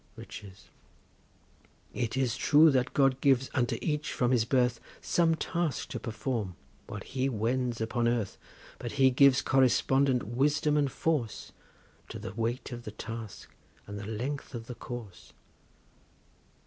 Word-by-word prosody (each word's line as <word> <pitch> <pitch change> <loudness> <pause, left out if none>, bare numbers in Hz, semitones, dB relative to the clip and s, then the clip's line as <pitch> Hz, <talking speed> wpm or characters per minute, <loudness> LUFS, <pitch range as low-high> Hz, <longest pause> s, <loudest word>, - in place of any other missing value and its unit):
RICHES. 95 -2 -11 1.2
It 120 +1 -2
is 125 -3 +1
true 155 +1 +6
that 130 -2 0
God 135 -2 +3
gives 135 -2 +3
unto 120 -4 +1
each 150 -1 -1
from 125 -1 +1
his 120 -3 +3
birth 125 -1 +2 0.2
Some 165 -2 +2
task 170 -1 -2
to - - -4
perform 110 -4 -3 0.3
whilst - - -7
he 130 0 0
wends 120 +1 -1
upon 115 +1 0
earth, 115 -4 -1 0.4
But 120 - -5
He 135 -2 +5
gives 135 0 +5
correspondent 135 0 +3
wisdom 145 +6 +1
and 145 -3 +2
force 145 -9 -2 0.6
To - - -6
the 95 - -7
weight 115 +4 -2
of 120 -1 -6
the 110 - -7
task, 110 -1 -8 0.3
and 100 0 -7
the 100 - -7
length 130 +5 -4
of 115 -1 -6
the 125 - -6
course. 120 -6 -9
125 Hz, 145 wpm, -30 LUFS, 115-135 Hz, 1.2 s, true